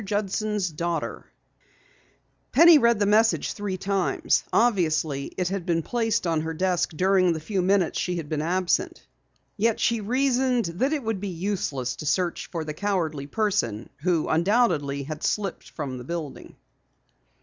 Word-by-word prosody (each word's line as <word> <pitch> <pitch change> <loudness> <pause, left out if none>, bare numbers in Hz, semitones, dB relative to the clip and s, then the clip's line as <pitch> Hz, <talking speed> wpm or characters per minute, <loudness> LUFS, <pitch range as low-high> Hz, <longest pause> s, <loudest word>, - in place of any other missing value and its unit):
JUDSON'S 205 -2 -1
DAUGHTER_ 170 +1 -3 1.3
Penny 335 -2 +8
read 235 -3 +4
the 205 - +1
message 220 +2 +3
three 205 -2 -4
times. 195 -1 0
Obviously, 160 - +1
it 180 -1 0
had 195 -2 -3
been 165 -2 0
placed 230 0 0
on 165 -2 +1
her 160 +1 -4
desk 180 0 +1
during 185 0 +3
the 160 - -4
few 190 +4 -2
minutes 185 -2 +1
she 180 - -1
had 165 -4 -4
been 150 0 -2
absent. 175 +2 -1 0.5
Yet 225 +1 +1
she 230 -2 +1
reasoned 255 +1 +1
that 180 - -1
it 300 -4 -1
would 220 -3 -2
be 205 - -3
useless 170 -9 -3
to 150 - -6
search 175 +2 0
for 165 -3 -3
the 155 -1 -5
cowardly 160 -6 -2
person 145 - -1
who 170 -1 +1
undoubtedly 165 - +1
had 155 +2 -6
slipped 200 -3 -2
from 135 -5 -5
the - - -8
building. 160 0 -6
185 Hz, 155 wpm, -25 LUFS, 160-210 Hz, 1.3 s, Penny